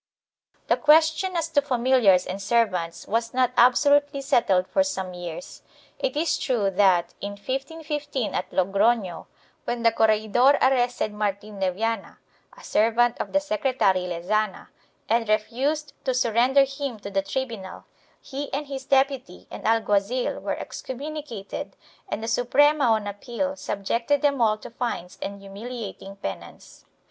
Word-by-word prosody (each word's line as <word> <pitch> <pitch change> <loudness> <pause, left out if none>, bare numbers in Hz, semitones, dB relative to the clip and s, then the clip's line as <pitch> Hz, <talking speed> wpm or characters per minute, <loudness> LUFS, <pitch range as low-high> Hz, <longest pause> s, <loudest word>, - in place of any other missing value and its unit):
2 - - -37
The - - +4
question 315 +4 +4
as 330 -1 0
to 285 - +3
familiars 245 -8 +3
and 190 +2 -5
servants 195 -6 0
was 230 +2 -1
not 255 -1 +3
absolutely 285 +4 +4
settled 190 -8 +2
for 285 - +2
some 190 -10 -4
years. 175 - -8 0.4
It - - -2
is 325 +1 +1
true 225 -8 0
that, 185 -3 +3
in 200 0 -4
1515 280 +3 -4
at - - -2
Logrono, 195 0 +1 0.4
when 240 -1 -3
the 230 - +5
corregidor 220 +6 +3
arrested 245 -4 +1
Martin 205 0 -3
de 190 -1 +1
Viana, 225 +2 -3 0.4
a - - -14
servant 235 +2 +2
of - - -4
the 290 - +2
secre 290 -3 -1
tary 185 -4 +2
Lezana, 190 +4 -2 0.4
and 225 0 +1
refused 270 +8 0
to 260 -2 0
surrender 250 +3 +4
him 275 -3 -4
to 200 -1 -8
the 195 0 +1
tribunal, 220 -3 -5 0.3
he 280 +1 -6
and 290 +2 -2
his 270 -1 -6
deputy 270 -8 0
and - - -5
alguazil 225 +2 +1
were - - -2
excommunicated 275 -6 -6 0.3
and 220 - -3
the - - -3
Suprema 280 +5 +3
on 220 -3 +2
appeal 240 +7 -3
subjected 235 +5 -1
them 280 -3 +2
all 215 -2 +3
to 235 +3 -11
fines 230 -7 -4
and 200 0 -5
humiliating 200 -1 -8
penance. 95 - -8
235 Hz, 145 wpm, -25 LUFS, 200-275 Hz, 0.4 s, the